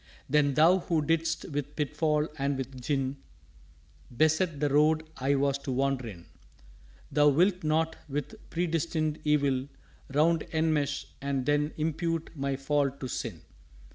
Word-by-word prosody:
"_Then 145 -2 +3
Thou 170 +6 +6
who 165 -3 0
didst 165 +1 0
with 145 0 -4
pitfall 150 +1 0
and 140 0 0
with 130 -1 -6
gin 135 0 -1 1.0
Beset 155 +1 +2
the 145 - +2
Road 155 +2 +3
I 135 +2 +1
was 140 0 +1
to 140 - -5
wander 135 -1 0
in, 90 -6 -10 0.9
Thou 150 0 +5
wilt 180 +5 +2
not 160 +1 +1
with 145 0 -5
Predestined 165 -2 -1
Evil 140 -3 +2 0.4
round 160 +3 +2
Enmesh, 155 -3 +1 0.2
and 140 -2 -1
then 145 +1 +1
impute 165 +1 -1
my 140 -1 -1
fall 140 +1 +1
to 135 -1 -7
sin. 110 -9 -5
145 Hz, 140 wpm, -29 LUFS, 140-160 Hz, 1.0 s, Thou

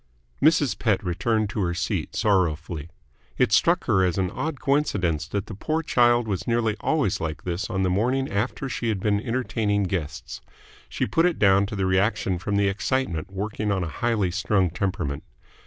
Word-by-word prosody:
Mrs. 150 -4 +3
Pett 105 -5 +1
returned 105 +4 0
to 110 - -3
her 85 -3 0
seat, 85 0 -2
sorrowfully. 85 -6 0 0.5
It - - +2
struck 170 - +4
her 100 -6 +2
as 90 -3 +1
an 95 -1 0
odd 145 +4 -3
coincidence 100 - 0
that 100 +2 -3
the - - -8
poor 155 +11 -2
child 120 -4 +3
was 95 -4 -3
nearly 115 -2 +1
always 125 - 0
like 80 -2 -4
this 90 +4 -3
on 95 -3 -1
the 95 - +2
morning 125 +8 +1
after 105 +6 -2
she 120 -2 -2
had 105 -3 -1
been 105 +1 +1
entertaining 115 -4 0
guests; 90 -5 -4 0.5
she - - -1
put 165 +2 +2
it 175 - -1
down 100 0 +4
to 105 - -5
the 95 -1 0
reaction 95 -1 +1
from 100 +3 -2
the 100 0 +3
excitement 100 - -1
working 105 +2 -2
on 95 -2 0
a 85 - -3
highly 110 -6 +1
strung 95 -1 +1
temperament. 90 -7 -2
100 Hz, 185 wpm, -25 LUFS, 90-120 Hz, 0.5 s, struck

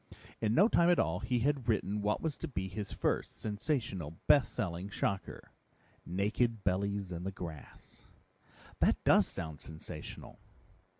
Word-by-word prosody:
In 110 0 +1
no 200 +5 +7
time 170 -6 +4
at 175 - +5
all, 80 +2 +1
he 125 -2 0
had 135 -1 +1
written 105 -2 +1
what 105 +1 0
was 160 -3 -1
to 165 - -4
be 95 -10 -3
his 100 +2 -5
first, - - 0
sensational, 105 - -2
best 140 - +5
selling 95 -3 -3
shocker, 100 -3 -3 0.6
Naked 105 +4 0
Bellies 100 0 0
in 85 0 -4
the 95 - -2
Grass." 85 -6 -9 0.8
"That - - +4
does - - +6
sound 80 -2 -5
sensational." 80 0 -8
100 Hz, 145 wpm, -33 LUFS, 90-125 Hz, 0.8 s, no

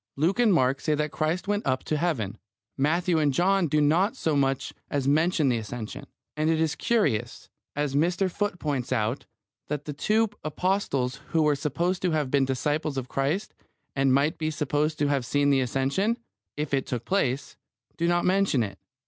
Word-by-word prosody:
Luke 165 - +1
and 235 -3 +5
Mark 135 -6 +2
say 155 - +1
that 150 0 -1
Christ 160 +5 -1
went 205 +1 0
up 130 -1 0
to 155 - -1
Heaven. 130 - -1 0.4
Matthew 165 +4 +1
and 150 -2 +3
John 185 +5 +2
do 150 +1 +2
not 170 - +3
so 160 - 0
much 135 -1 0 0.2
as 140 -2 -1
mention 155 0 +3
the 120 -2 +1
Ascension. 120 +5 -7 0.3
And 155 +1 +1
it 160 -1 +2
is 160 -1 +1
curious, 120 - 0 0.3
as 145 -1 -1
Mr. 175 +6 +2
Foote 205 -1 -2
points 140 -7 -2
out, 115 +1 -1 0.4
that 150 -1 -3
the 150 - -4
two 215 +9 +2
apostles 155 -6 -1
who 160 -2 +2
were 150 -1 +3
supposed 170 +6 -1
to 185 - +1
have 150 -4 0
been 140 -1 +3
disciples 145 +2 -1
of 130 -1 -4
Christ 145 +9 -1 0.4
and 135 -1 +3
might 140 +4 +2
be 155 -1 0
supposed 150 +1 -1
to 145 - +1
have 140 -3 +1
seen 145 +3 +2
the 135 -1 +3
Ascension, 135 - 0 0.4
if 150 -1 -3
it 135 -1 +1
took 120 -2 -3
place, 140 -9 0 0.4
do 170 - 0
not 175 0 +2
mention 185 -9 +3
it. 100 - -6
150 Hz, 190 wpm, -26 LUFS, 135-175 Hz, 0.4 s, and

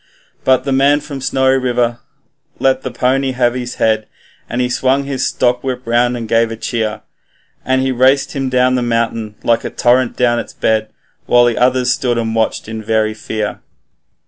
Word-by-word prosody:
But 130 -1 +3
the 140 - -2
man 140 +2 +3
from 145 -2 -8
Snowy 130 0 +2
River 120 -2 0 0.6
let 130 0 +1
the 130 - -4
pony 130 +2 0
have 120 -1 +1
his 125 -1 -5
head, 110 -1 +1 0.4
And 120 - -3
he 125 - +1
swung 130 +2 +1
his 135 -2 -2
stockwhip 125 +1 -1
round 120 +1 +1
and 115 -1 -5
gave 115 +1 +2
a 115 - -5
cheer, 110 -1 -3 0.6
And 130 0 +1
he 130 - 0
raced 130 +2 +3
him 135 -2 -2
down 125 0 +2
the 125 - +1
mountain 115 -2 -1
like 115 0 +2
a - - -3
torrent 125 0 +1
down 120 -1 +2
its - - -7
bed, 110 -1 0 0.4
While 120 0 +5
the 120 -2 +1
others 125 0 +2
stood 120 -2 -1
and 115 -1 -1
watched 110 -1 -1
in 110 0 -6
very 110 0 +1
fear. 110 -1 -4
125 Hz, 185 wpm, -16 LUFS, 115-130 Hz, 0.6 s, While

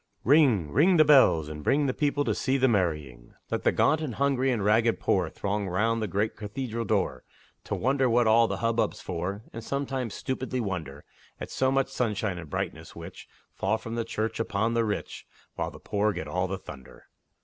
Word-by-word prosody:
Ring! 120 - +4
ring 170 - +4
the 155 - +6
bells, 130 - +5
and 75 0 -7
bring 145 - +2
The 130 - 0
people 145 0 0
to 110 - +1
see 130 +6 0
the 130 0 +3
marrying! 75 - -2 0.2
Let - - -1
the - - +4
gaunt 155 +2 +2
and 135 -8 -4
hungry 135 -1 +1
and 110 -5 -1
ragged 110 +2 +3
poor 90 -4 +1
Throng 100 +2 -3
round 110 +5 0
the 110 - -1
great 100 +4 -1
cathedral 115 +2 -4
door, 95 -11 0 0.4
To - - -2
wonder 130 +1 +1
what 120 +1 +3
all 115 +1 +5
the - - -3
hubbub's 115 -2 0
for, 95 +4 -4
And 115 - -7
sometimes 135 -3 -3
stupidly 130 -1 -3
wonder 80 - -4 0.3
At - - -7
so 130 0 +1
much 135 0 +1
sunshine 105 -7 -1
and 80 -3 -9
brightness - - -5
which - - -10 0.3
Fall 100 +3 0
from 115 0 -8
the 115 0 -1
church 110 0 -3
upon 110 +1 0
the 115 -1 +2
rich, 105 -1 -4 0.3
While - - -3
the - - -12
poor 105 +1 0
get 80 - -5
all 90 +5 -1
the 95 +1 -3
thunder. 65 -7 -12
110 Hz, 200 wpm, -27 LUFS, 95-130 Hz, 0.4 s, the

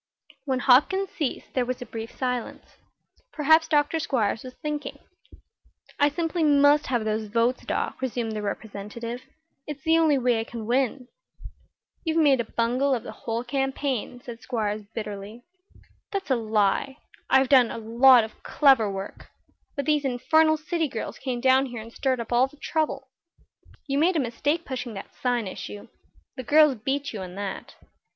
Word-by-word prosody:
When 265 -2 0
Hopkins 355 +11 +4
ceased 295 -6 -4
there 255 - +1
was 250 0 -3
a 245 - -7
brief 225 0 -8
silence. 250 -2 -4 0.5
Perhaps 315 +2 +4
Dr. 300 +1 +2
Squiers 225 -8 -1
was 255 0 -10
thinking. 295 -2 -5 1.0
"I 290 - +5
simply 330 +2 -1
must 290 0 +4
have 240 -4 0
those 215 0 -1
votes, 230 +4 +1
Doc," - - -2
resumed 240 -3 -2
the 215 -1 -4
Representative. 215 +4 -6 0.5
"It's 295 -2 -7
the 325 +1 +4
only 310 -3 +4
way 245 -3 +2
I - - -1
can 230 -1 -7
win." 250 +1 0 1.0
"You've 325 -2 -1
made 285 -5 +4
a - - +1
bungle 250 +5 +1
of 235 - -5
the - - -7
whole 230 +1 -4
campaign," 270 -1 -2
said 240 -2 -9
Squiers, 215 -4 -3
bitterly. 210 +1 -6 0.7
"That's 390 -7 -3
a - - +5
lie. 220 +4 0 0.3
I've 265 -1 +4
done 255 -4 +6
a - - -5
lot 235 +2 +6
of 220 - -10
clever 265 -8 +4
work. 195 0 -7 0.5
But 280 -2 -3
these 300 -1 +2
infernal 315 +5 +3
city 320 +1 -1
girls 230 -5 -6
came 255 -2 -3
down 265 +1 +4
here 240 -2 -7
and 225 +1 -10
stirred 260 -2 0
up 235 +1 -4
all 250 +2 +4
the 295 +2 -20
trouble." 290 -4 -2 0.8
"You 275 -1 0
made 345 +4 +3
a - - +2
mistake 285 +6 -1
pushing 245 -4 -5
that 195 - -9
sign 245 -3 -1
issue. 105 - -8 0.5
The 255 - -5
girls 300 +2 +5
beat 270 +4 -3
you 215 - -5
on 180 -1 -8
that." 200 -1 -6
255 Hz, 170 wpm, -25 LUFS, 230-290 Hz, 1.0 s, done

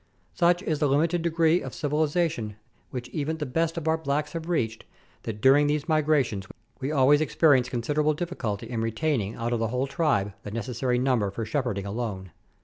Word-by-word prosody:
Such 175 +1 +3
is 155 -5 -1
the 150 - +3
limited 165 +5 +2
degree 165 0 +2
of - - -7
civilization 150 - 0 0.3
which 125 -2 -5
even 155 +1 -2
the 150 - -3
best 165 +5 -1
of 160 -1 -3
our 160 0 +2
blacks 150 0 -1
have 165 0 -5
reached, 110 -10 -1 0.4
that 105 -2 -6
during 140 +3 +6
these 150 +1 -1
migrations 145 - +1 0.3
we 135 +2 -2
always 145 +1 +4
experience 145 -5 +3
considerable 150 +6 0
diffi 175 +3 -4
culty 105 -4 -3
in 115 -2 -3
retaining 115 -2 -1
out 115 +1 -2
of 120 - 0
the 115 - 0
whole 125 +3 -1
tribe 135 - 0
the - - -7
necessary 120 +3 -1
number 125 -5 +1
for 110 +3 -4
shepherding 110 -5 -2
alone. 100 -4 -4
140 Hz, 185 wpm, -26 LUFS, 115-155 Hz, 0.4 s, during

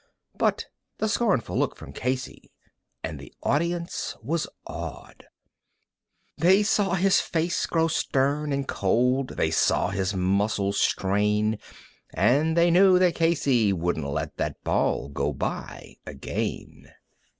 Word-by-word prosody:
But - - 0 0.3
the 215 - 0
scornful 210 - 0
look - - 0
from 70 - -11
Casey, 130 - -4 0.5
and - - -5
the - - -12
audience 170 +4 -1
was 155 +6 -1 0.2
awed; - - -8 1.1
They 190 +6 +5
saw 200 -3 +1
his 190 +1 +3
face 170 +1 -1
grow 165 -1 +2
stern 145 -1 0
and 140 0 -1
cold, 125 +7 0
they 80 - +1
saw - - +2
his 95 0 -2
muscles 100 +2 0
strain, 105 +2 +1 0.6
And 155 +6 +2
they 170 0 +5
knew 185 +1 +6
that 180 -2 +3
Casey 140 -10 +2
wouldn't 85 -5 -1
let 75 +1 -4
that - - -3
ball 65 - 0
go 70 - -2
by - - -5
again. - - -5
135 Hz, 125 wpm, -25 LUFS, -, 1.1 s, knew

